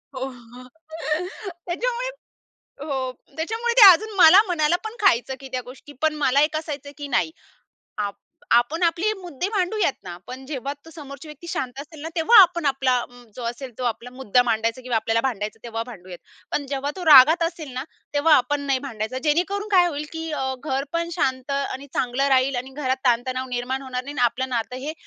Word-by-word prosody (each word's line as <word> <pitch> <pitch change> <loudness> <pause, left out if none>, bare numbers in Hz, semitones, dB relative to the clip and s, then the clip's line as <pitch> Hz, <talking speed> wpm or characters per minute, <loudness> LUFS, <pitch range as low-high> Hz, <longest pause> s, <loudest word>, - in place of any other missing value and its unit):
हो, 260 0 -3
हो. 245 0 -14 1.0
त्याच्यामुळे - - -2 0.8
हो. 265 -3 -2 0.2
त्याच्यामुळे 450 +9 -1
ते - - +8
अजून 430 +5 -2
मला 360 +1 +9
मनाला 335 -1 +2
पण 440 +1 -5
खायचं, 265 - +3
की 270 - -9
त्या 255 - -1
गोष्टीपण 290 +4 -4
मला 275 +1 +4
एक 310 +1 +1
असायचं, 295 -3 -5
की 290 -1 -6
नाही. - - +1 1.2
आपण 245 +9 +3
आपले 345 +5 +2
मुद्दे 355 -1 -4
भांडूयात 390 -5 0
ना, 175 -2 -8
पण 260 +1 -8
जेव्हा 275 -1 -4
तो - - -12
समोरची 285 0 -10
व्यक्ती 300 +3 -11
शांत 260 -5 -4
असेल 305 +1 -12
ना, 320 - -5
तेव्हा 350 +8 +5
आपण 345 -3 +2
आपला 265 -2 +2 0.4
जो 250 - -7
असेल 240 +3 -5
तो 255 - -5
आपला 235 +1 -3
मुद्दा 250 -1 +2
मांडायचा 230 +1 -1
किंवा 250 -1 -3
आपल्याला 225 +1 0
भांडायचा 225 -4 -3
तेव्हा 225 -1 -4
भांडूयात. 185 -6 -10 0.3
पण 285 - -1
जेव्हा 280 +1 -2
तो 365 -2 -6
रागात 310 +3 +8
असेल 330 -4 -4
ना, 255 +1 -3 0.3
तेव्हा 300 +2 +5
आपण 285 +3 +1
नाही 270 -1 +2
भांडायचा. 220 -1 -4
जेणेकरून 365 +7 0
काय 365 -3 +6
होईल, 300 -3 -4
की 325 0 -5
अ, 265 -3 -2
घर 270 -2 -1
पण 335 0 -1
शांत 260 +1 -1
आणि 275 0 -3
चांगलं 255 +2 0
राहील 265 0 +3
आणि 250 +2 -5
घरात 265 -2 -1
ताण-तणाव 255 +2 +1
निर्माण 250 +2 -3
होणार 255 -1 -4
नाही 285 +2 -7
आणि 245 - +4
आपलं 255 +3 -1
नातं 245 0 -2
हे 310 - -3
275 Hz, 185 wpm, -23 LUFS, 250-325 Hz, 1.2 s, मला